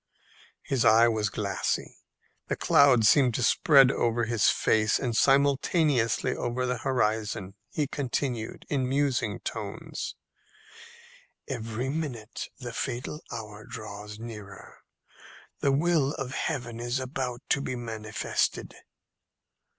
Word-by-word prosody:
His 130 Hz, -4 st, 0 dB
eye 115 Hz, +2 st, +6 dB
was 110 Hz, -3 st, 0 dB
glassy. 100 Hz, -2 st, -2 dB, 0.5 s
The -, -, -1 dB
cloud 125 Hz, -6 st, +5 dB
seemed 125 Hz, +1 st, +5 dB
to 125 Hz, -, 0 dB
spread 135 Hz, +3 st, +6 dB
over 120 Hz, -2 st, 0 dB
his 115 Hz, -2 st, +3 dB
face 110 Hz, 0 st, +2 dB
and 120 Hz, -3 st, -2 dB
simultaneously 140 Hz, -1 st, +2 dB
over 125 Hz, +1 st, -2 dB
the 125 Hz, -1 st, -1 dB
horizon. 110 Hz, -5 st, -1 dB, 0.2 s
He 150 Hz, -, -1 dB
continued, 130 Hz, -4 st, -3 dB
in 130 Hz, -3 st, 0 dB
musing 140 Hz, -1 st, 0 dB
tones, -, -, -5 dB, 1.3 s
"Every 120 Hz, 0 st, -3 dB
minute 130 Hz, -8 st, -4 dB
the 120 Hz, -3 st, -7 dB
fatal 125 Hz, +7 st, -4 dB
hour 105 Hz, -1 st, -7 dB
draws 105 Hz, -3 st, -8 dB
nearer. 105 Hz, -3 st, -10 dB, 0.8 s
The 140 Hz, -, +2 dB
will 150 Hz, -1 st, +2 dB
of 130 Hz, -1 st, -4 dB
Heaven 125 Hz, -8 st, -3 dB
is 120 Hz, +2 st, -1 dB
about 130 Hz, -2 st, -4 dB
to 140 Hz, -, +2 dB
be 130 Hz, -, -3 dB
manifested." 110 Hz, -3 st, -2 dB
120 Hz, 115 wpm, -28 LUFS, 110-135 Hz, 1.3 s, eye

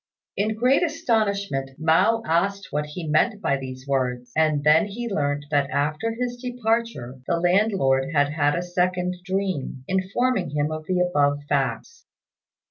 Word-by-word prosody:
In 215 Hz, +2 st, 0 dB
great 250 Hz, +5 st, +3 dB
astonishment, 215 Hz, -, 0 dB
Mao 185 Hz, +9 st, +3 dB
asked 195 Hz, +4 st, 0 dB
what 150 Hz, 0 st, -1 dB
he 160 Hz, +2 st, -6 dB
meant 200 Hz, +8 st, +2 dB
by 140 Hz, -, +1 dB
these 130 Hz, -1 st, -8 dB
words; 125 Hz, -3 st, -1 dB
and 155 Hz, -2 st, +2 dB
then 155 Hz, +6 st, +5 dB
he 235 Hz, +4 st, -5 dB
learnt 145 Hz, -7 st, -1 dB
that 140 Hz, -1 st, +2 dB
after 155 Hz, +11 st, -1 dB
his 245 Hz, -1 st, -2 dB
departure 230 Hz, -, -2 dB
the 170 Hz, -, +1 dB
landlord 175 Hz, -8 st, +2 dB
had 145 Hz, -2 st, +2 dB
had 145 Hz, -1 st, +1 dB
a 175 Hz, -, -1 dB
second 180 Hz, 0 st, -1 dB
dream 185 Hz, -9 st, -3 dB
informing 190 Hz, -, 0 dB
him 150 Hz, +1 st, 0 dB
of 155 Hz, 0 st, -6 dB
the 185 Hz, -1 st, +1 dB
above 145 Hz, -5 st, +1 dB
facts. 145 Hz, -, -2 dB
175 Hz, 150 wpm, -24 LUFS, 145-210 Hz, -, then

